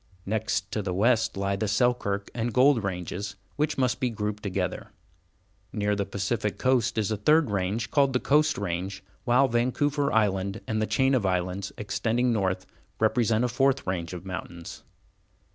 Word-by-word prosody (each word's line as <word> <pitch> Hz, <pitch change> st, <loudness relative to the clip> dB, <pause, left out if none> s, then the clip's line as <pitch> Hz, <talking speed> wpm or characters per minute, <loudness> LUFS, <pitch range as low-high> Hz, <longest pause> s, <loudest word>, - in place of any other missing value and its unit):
Next 110 Hz, +2 st, -1 dB
to 110 Hz, -, -1 dB
the 95 Hz, -2 st, -3 dB
west 115 Hz, +1 st, +2 dB
lie 100 Hz, 0 st, 0 dB
the 105 Hz, +2 st, -2 dB
Selkirk 105 Hz, -2 st, 0 dB
and 120 Hz, 0 st, -2 dB
Gold 125 Hz, 0 st, +4 dB
ranges, 100 Hz, +1 st, -4 dB, 0.2 s
which 150 Hz, +1 st, 0 dB
must 130 Hz, -2 st, +1 dB
be 125 Hz, -, +1 dB
grouped 105 Hz, -2 st, -3 dB
together. 95 Hz, -2 st, -3 dB, 0.8 s
Near 105 Hz, -1 st, 0 dB
the 100 Hz, -1 st, -2 dB
Pacific 100 Hz, +2 st, -2 dB
Coast 125 Hz, -3 st, +1 dB
is 110 Hz, 0 st, 0 dB
a 110 Hz, -, 0 dB
third 150 Hz, +3 st, +3 dB
range 100 Hz, +3 st, -1 dB
called 140 Hz, -3 st, +3 dB
the 125 Hz, -, +2 dB
Coast 150 Hz, +3 st, +3 dB
Range, 95 Hz, +1 st, -3 dB, 0.2 s
while 125 Hz, +3 st, +4 dB
Vancouver 140 Hz, +4 st, +1 dB
Island 100 Hz, -2 st, +1 dB
and 110 Hz, -1 st, -1 dB
the 110 Hz, -, 0 dB
chain 130 Hz, 0 st, +2 dB
of 125 Hz, -5 st, +2 dB
islands 90 Hz, +1 st, -1 dB
extending 115 Hz, +4 st, 0 dB
north 95 Hz, -3 st, -1 dB, 0.3 s
represent 110 Hz, 0 st, +2 dB
a -, -, +2 dB
fourth 135 Hz, +2 st, +1 dB
range 90 Hz, -2 st, -2 dB
of 90 Hz, +1 st, -7 dB
mountains. 90 Hz, -2 st, -7 dB
105 Hz, 165 wpm, -27 LUFS, 100-125 Hz, 0.8 s, Gold